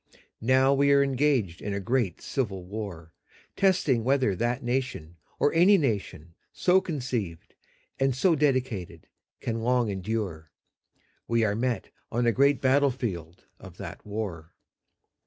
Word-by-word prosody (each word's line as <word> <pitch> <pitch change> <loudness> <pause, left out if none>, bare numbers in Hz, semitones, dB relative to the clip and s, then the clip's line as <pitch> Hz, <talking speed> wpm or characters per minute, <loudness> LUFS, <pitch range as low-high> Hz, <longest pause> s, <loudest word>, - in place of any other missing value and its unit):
Now 130 +3 +4
we 140 +1 +3
are 140 0 +5
engaged 130 - 0
in 100 -1 -3
a - - -2
great 110 -3 -1
civil 100 -9 -3
war.. 90 -5 -7 0.4
.testing 155 -11 +2
whether 130 -5 +2
that 120 +6 -1
nation, 120 -10 -3 0.2
or 145 - +2
any 180 +5 +6
nation 100 - -2 0.2
so 185 +1 +3
conceived 125 - -4 0.5
and 135 -1 +2
so 170 +7 +3
dedicated... 130 - -1 0.4
can 115 0 -2
long 120 -1 +1
endure. 95 -5 -4 0.8
We 115 -1 +2
are 100 -2 +1
met 120 +2 -2 0.2
on 120 +1 0
a 120 - +4
great 140 +3 +3
battlefield 125 - 0
of - - -12
that - - -8
war. 95 -6 -5
120 Hz, 135 wpm, -27 LUFS, 100-135 Hz, 0.8 s, any